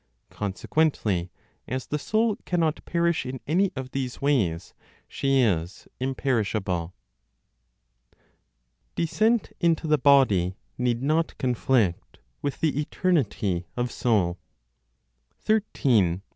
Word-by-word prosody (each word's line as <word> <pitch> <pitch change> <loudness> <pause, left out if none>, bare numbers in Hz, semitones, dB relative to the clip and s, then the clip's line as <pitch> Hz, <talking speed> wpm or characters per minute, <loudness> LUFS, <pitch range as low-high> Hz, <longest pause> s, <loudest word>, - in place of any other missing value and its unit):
Consequently 100 - 0 0.4
as 130 0 -3
the 150 - -3
soul 220 +6 +1
cannot 165 -3 0
perish 170 -1 +1
in 130 0 -5
any 185 +6 +2
of 130 -1 -6
these 130 -2 -3
ways, 105 - 0 0.3
she 135 -1 +1
is 90 -6 -1
imperishable. 110 -9 -1 2.0
DESCENT 215 +7 +1
INTO 165 -2 +2
THE 150 -1 +3
BODY 125 -11 +4 0.2
NEED 125 0 0
NOT 160 +3 0
CONFLICT 125 -7 0 0.2
WITH 140 -2 -3
THE 150 -3 +1
ETERNITY 110 - 0
OF 120 0 -1
SOUL. 95 -7 +1 1.1
13. 170 - +3
(18). 95 - -11
130 Hz, 105 wpm, -26 LUFS, 105-160 Hz, 2.0 s, BODY